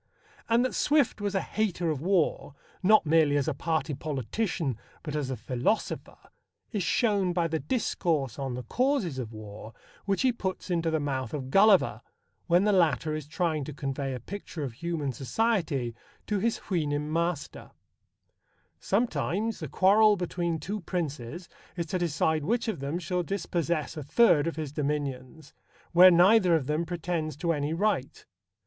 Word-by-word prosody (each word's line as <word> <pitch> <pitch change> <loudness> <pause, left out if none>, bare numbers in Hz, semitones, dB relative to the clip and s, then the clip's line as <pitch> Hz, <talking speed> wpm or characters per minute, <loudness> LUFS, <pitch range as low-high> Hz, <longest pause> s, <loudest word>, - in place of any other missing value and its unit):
And 235 +2 +4
that 255 - -2
Swift 290 -7 +2
was 205 -1 -2
a 195 - +2
hater 180 -6 -1
of 145 -3 -3
war, 160 -6 0 0.3
not 215 0 +5
merely 155 -2 +4
as 140 - 0
a 155 - +1
party 160 0 -1
politician, 145 - -2 0.2
but 150 -2 -5
as 145 -3 -2
a 130 - -3
philosopher, 130 - -2 0.5
is 210 - -1
shown 195 -1 +1
by 170 -1 +1
the 160 -1 -2
discourse 160 - -1
on 135 -3 -3
the 125 - -5
causes 235 - 0
of 115 -3 -5
war 110 0 -10 0.3
which 200 +3 0
he 260 - +4
puts 190 -3 -4
into 165 -1 +1
the 160 -1 +1
mouth 135 -3 -3
of 130 -2 -5
Gulliver 195 +1 +5 0.5
when 175 +1 +4
the 210 - +3
latter 160 -5 +2
is 155 -2 -5
trying 155 -2 -1
to 150 - -7
convey 135 -1 -3
a - - -6
picture 175 - -7
of 130 -4 -4
human 160 0 -3
society 145 - -1 0.3
to 210 -2 -1
his 230 +3 0
Houyhnhnm 150 -5 -1
master: 170 -2 -2 1.1
Sometimes 220 0 -1
the - - -5
quarrel 210 +3 +5
between 175 -2 -2
two 195 +7 -4
princes 165 -2 -4 0.3
is 170 - -1
to 180 +3 -2
decide 160 -2 0
which 235 +9 0
of 215 -9 -2
them 140 +4 -3
shall 180 +1 -1
dispossess 170 -4 -2
a 155 - -5
third 155 - +4
of 165 - -2
his 155 -3 -4
dominions, 145 -1 -4 0.4
where 180 +2 +9
neither 180 +1 +5
of 150 -5 0
them 155 +4 -1
pretends 165 -3 -3
to 170 +1 0
any 145 0 -2
right. 170 -6 -1
165 Hz, 165 wpm, -28 LUFS, 145-190 Hz, 1.1 s, where